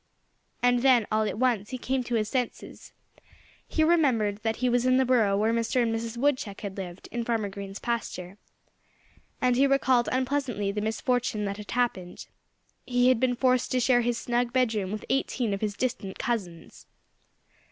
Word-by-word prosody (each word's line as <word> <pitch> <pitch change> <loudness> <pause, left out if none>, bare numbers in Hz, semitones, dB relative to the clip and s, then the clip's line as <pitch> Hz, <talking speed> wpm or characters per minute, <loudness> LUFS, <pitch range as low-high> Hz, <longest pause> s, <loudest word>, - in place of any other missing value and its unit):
And 245 0 +4
then 250 -4 +5
all 215 0 +2
at 210 - -3
once 230 -5 +1
he 255 - -4
came 260 +1 -1
to 240 - -2
his 215 -2 0
senses. 250 +1 -4 0.8
He 315 - +1
remembered 260 -11 +2
that 225 0 -1
he 255 - -1
was 245 0 +2
in 255 0 +4
the 265 - +3
burrow 225 -6 +3
where 220 +2 +2
Mr. 230 +2 0
and 225 -1 0
Mrs. 230 +1 -4
Woodchuck 255 -6 -1
had 200 -3 -5
lived, 185 -2 -7
in 240 0 -2
Farmer 225 -3 -1
Green's 195 0 -7
pasture. 200 -5 -4 1.0
And 250 -2 +3
he 275 +3 +4
recalled 260 -3 +2
unpleasantly 255 -6 -1
the 210 +1 -3
misfortune 220 0 -1
that 200 0 -3
had 210 -1 -10
happened: 230 -8 -2 0.6
he 245 0 +2
had 255 -3 +3
been 250 0 +1
forced 255 0 +1
to 255 - +2
share 245 0 +3
his 240 0 0
snug 240 0 -1
bedroom 225 -7 0
with 215 0 -5
eighteen 250 -4 0
of 195 - -4
his 210 -2 -2
distant 215 -6 -3
cousins. 180 -9 -4
235 Hz, 180 wpm, -27 LUFS, 210-255 Hz, 1.0 s, then